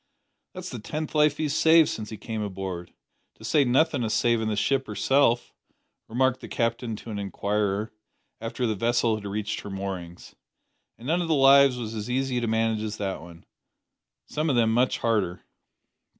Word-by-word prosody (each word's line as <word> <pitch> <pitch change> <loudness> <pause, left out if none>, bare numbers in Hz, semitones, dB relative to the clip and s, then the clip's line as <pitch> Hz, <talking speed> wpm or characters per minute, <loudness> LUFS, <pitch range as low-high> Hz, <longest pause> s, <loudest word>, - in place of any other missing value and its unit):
"That's 185 0 -6
the 125 - -6
tenth 150 +9 -5
life 150 -1 +3
he's 150 -2 -1
saved 160 0 +6
since 110 -1 -5
he 110 - -7
came 110 0 -5
aboard 95 -3 -5 0.4
to - - -17
say 150 - +3
nothin' 135 +1 +2
o' - - 0
savin' 115 0 +1
the 110 - 0
ship 135 +6 0
herself," 120 +2 +2 0.5
remarked 130 +2 +1
the - - -9
Captain 115 -1 -1
to 110 +2 -9
an 105 - -4
inquirer, 100 +1 -1 0.5
after 115 +2 -3
the 110 - +1
vessel 115 +2 +1
had 105 -1 -4
reached 105 +1 -3
her - - -8
moorings. 95 -3 -6 0.6
"An' 115 - -13
none 165 +6 +1
o' 170 - -2
the 160 - +2
lives 135 -1 +6
was 115 -2 -5
as 110 +1 -5
easy 130 0 0
to 120 - -1
manage 110 -1 +1
as 110 0 -4
that 95 -4 -3
one. 85 0 -13 0.8
Some 155 +1 -2
o' 135 - +2
them 115 -2 +3
much 125 +2 +2
harder." 105 -6 0
115 Hz, 180 wpm, -26 LUFS, 105-135 Hz, 0.8 s, saved